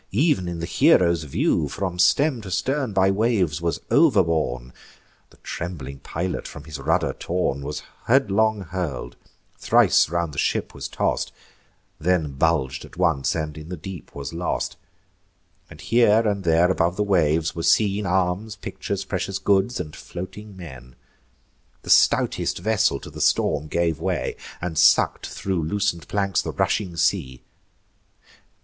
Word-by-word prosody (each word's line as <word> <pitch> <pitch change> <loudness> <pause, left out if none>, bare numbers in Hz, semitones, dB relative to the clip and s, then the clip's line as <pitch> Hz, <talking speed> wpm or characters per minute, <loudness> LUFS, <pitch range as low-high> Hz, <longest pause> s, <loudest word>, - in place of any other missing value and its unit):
ev'n 125 - +2
in 85 -1 -4
the 85 - -3
hero's 85 -2 +3
view, 75 +1 0
From 90 0 -4
stem 140 - +3
to 100 - -8
stern 130 - -1
by 95 0 +3
waves 95 -7 +1
was 85 -1 -1
overborne: 80 - +2 0.6
The - - -22
trembling 70 -6 -6
pilot, 90 +6 -4
from - - -10
his 75 -1 -8
rudder - - +1
torn, 85 -6 -2
Was 75 +2 -5 0.2
headlong 110 -4 +3
hurl'd; 85 -9 -5 0.4
thrice - - +4
round 85 -2 -2
the 70 - -4
ship - - -1
was - - -6
toss'd, - - -1 0.7
Then 80 -3 +1
bulg'd 70 -2 0
at - - -14
once, 80 -7 +1
and 75 -2 -3
in 80 +1 -10
the 90 - -5
deep 90 +2 -9
was 70 +2 -6
lost; 85 0 -2 0.9
And 75 - -13
here 115 0 +3
and 100 -2 -1
there 85 +2 +4
above 85 -1 +1
the 105 - 0
waves 80 -5 +2
were 85 - -4
seen 100 +2 +2
Arms, 95 +4 0
pictures, 100 -2 -5
precious 95 0 -2
goods, 100 +4 +1
and 75 -4 -6
floating 95 +3 -9
men. 65 -8 -11 0.9
The - - -2
stoutest - - +3
vessel 105 -5 +1
to - - -10
the - - -7
storm 75 0 +2
gave 85 -1 0
way, - - -2 0.3
And 85 -3 -2
suck'd - - +4
thro' 95 -1 -3
loosen'd 85 +1 -1
planks 100 -2 0
the - - -5
rushing 90 -5 -1
sea. 85 -8 0
90 Hz, 150 wpm, -23 LUFS, 80-100 Hz, 0.9 s, thrice